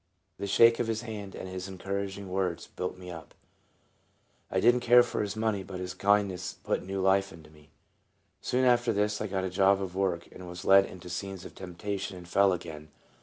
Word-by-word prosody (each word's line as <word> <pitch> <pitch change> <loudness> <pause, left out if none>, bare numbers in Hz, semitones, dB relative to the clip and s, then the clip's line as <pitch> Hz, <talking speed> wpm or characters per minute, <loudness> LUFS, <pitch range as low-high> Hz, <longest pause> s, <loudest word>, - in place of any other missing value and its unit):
The 100 - -3
shake 115 +4 +6
of 120 - 0
his 115 0 -2
hand 105 -4 -7
and - - -6
his 95 0 -5
encouraging 100 +1 -4
words 90 -2 -2
built 90 0 -5
me 90 -1 -9
up. 80 -1 -10 1.1
I 95 - 0
did 120 +5 +6
n't 125 - -1
care 120 +1 +7
for 120 - -3
his 100 -1 -3
money, 110 -2 0
but 95 -1 -7
his 90 0 -4
kindness 100 -3 +1
put - - 0
new 95 +1 -4
life 95 +1 +3
into 80 -2 -14
me. 75 -1 -20 0.7
Soon 130 +1 +1
after 120 -1 +4
this 105 0 0
I 105 - -1
got 95 -1 -2
a 95 - -1
job 95 +1 +4
of 95 -2 -4
work, 95 -3 -1
was 90 -1 -8
led 95 0 +7
into 90 -1 -11
scenes 95 +1 -5
of - - -10
temptation, 95 +1 -5
and 90 -1 -11
fell 100 +2 +4
again. 80 -3 -6
95 Hz, 205 wpm, -29 LUFS, 90-105 Hz, 1.1 s, care